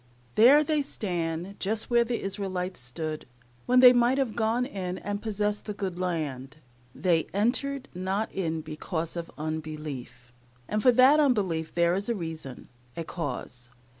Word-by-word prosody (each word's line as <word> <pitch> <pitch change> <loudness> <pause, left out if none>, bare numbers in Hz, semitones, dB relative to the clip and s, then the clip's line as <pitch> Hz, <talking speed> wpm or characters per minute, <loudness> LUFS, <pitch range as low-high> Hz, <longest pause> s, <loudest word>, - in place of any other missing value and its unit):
There 270 - +7
they 305 -1 +1
stand, 175 - -3
just 220 +4 -1
where 235 0 +5
the 235 0 -3
Israelites 190 -2 -3
stood, 155 +5 -5 0.4
when 250 +1 +5
they 250 -1 +10
might 245 +2 +3
have 265 -5 0
gone 235 +2 +1
in 185 -7 -4
and 205 0 -4
possessed 210 -1 -1
the 210 - -5
good 190 -3 -4
land. 150 -6 -3 0.4
"They 170 -4 +1
entered 270 +6 0
not 190 +4 -2
in 165 -4 -2
because 160 +2 -4
of 170 -1 -5
unbelief," 150 -5 -6 0.3
and 215 0 -1
for 250 - +6
that 260 +5 +6
unbelief 190 - +1
there 170 0 +3
is 200 +4 -1
a 235 - +1
reason 160 - -7 0.3
a 165 - -2
cause. 125 -7 -6
185 Hz, 155 wpm, -27 LUFS, 160-225 Hz, 0.4 s, they